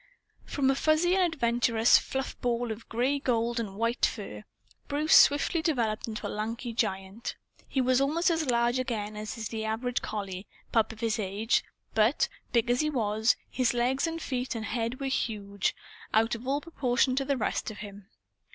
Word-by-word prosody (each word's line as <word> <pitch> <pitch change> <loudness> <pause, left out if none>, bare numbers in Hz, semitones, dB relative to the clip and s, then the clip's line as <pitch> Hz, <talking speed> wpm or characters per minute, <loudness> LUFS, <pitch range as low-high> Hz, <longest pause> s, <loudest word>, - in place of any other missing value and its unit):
From 270 -2 +1
a - - 0
fuzzy 315 +5 +3
and 365 -3 +3
adventurous 235 -4 +4
fluff 265 0 -4
ball 240 -1 0
of 220 +1 -8
gray 255 +5 +1
gold 235 -2 0
and 205 -4 -4
white 230 +3 -1
fur, 150 - -1 0.4
Bruce 300 +2 +1
swiftly 295 +3 +6
developed 235 -10 0
into 215 -2 -5
a - - 0
lanky 230 +3 -4
giant. 195 -1 -2 0.3
He 265 - 0
was 255 +1 +3
almost 330 +6 +2
as 320 -4 0
large 240 +1 +2
again 215 -5 -3
as 215 +1 -5
is 220 -1 -4
the 220 -1 -4
average 235 +3 -1
collie 195 -2 -5 0.2
pup 225 -1 +2
of 225 +1 -12
his 225 0 0
age; 205 +3 +1 0.3
but, 220 +6 +3 0.2
big 235 -2 +2
as 245 - +2
he 305 - +2
was, 220 -4 +2
his 245 -2 0
legs 255 +5 +1
and 330 0 -3
feet 255 -4 -3
and 220 -1 -3
head 230 +2 -2
were 275 - -3
huge, 205 -6 -1 0.4
out 225 +2 +3
of 235 +2 -5
all 280 +2 +1
proportion 260 -5 +1
to 275 - +2
the 280 0 0
rest 220 - -1
of 215 - -8
him. 200 -1 -12
235 Hz, 185 wpm, -29 LUFS, 220-265 Hz, 0.4 s, swiftly